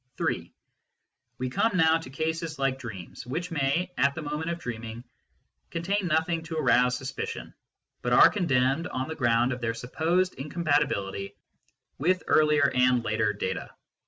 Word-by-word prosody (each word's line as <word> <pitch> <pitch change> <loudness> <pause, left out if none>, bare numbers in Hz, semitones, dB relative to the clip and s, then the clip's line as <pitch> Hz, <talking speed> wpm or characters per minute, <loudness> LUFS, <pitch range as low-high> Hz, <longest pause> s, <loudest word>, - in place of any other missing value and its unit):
(3) - - -2 0.9
We 130 0 -3
come 225 - +1
now 160 -1 +5
to 160 - -10
cases 160 +2 -3
like 135 -1 0
dreams, 105 -8 -8
which 170 +7 -3
may, 165 +4 0
at 140 0 +3
the 160 - -5
moment 150 +2 -3
of 170 - -2
dreaming, 115 -4 -6 0.7
contain 185 +3 -1
nothing 165 +1 +1
to 160 0 -5
arouse 125 -4 +3
sus 130 +1 -5
picion, - - -5 0.5
but 120 - -2
are - - +9
condemned 140 -3 +1
on 130 -4 -3
the 160 - -4
ground 120 -1 +2
of 125 - -7
their 115 -1 -1
supposed 165 +10 0
incompatibility 140 - -1 0.6
with 180 +6 +2
earlier 150 -2 +4
and 125 -1 +3
later 110 -1 +1
data. 95 -2 -4
140 Hz, 155 wpm, -27 LUFS, 125-165 Hz, 0.9 s, are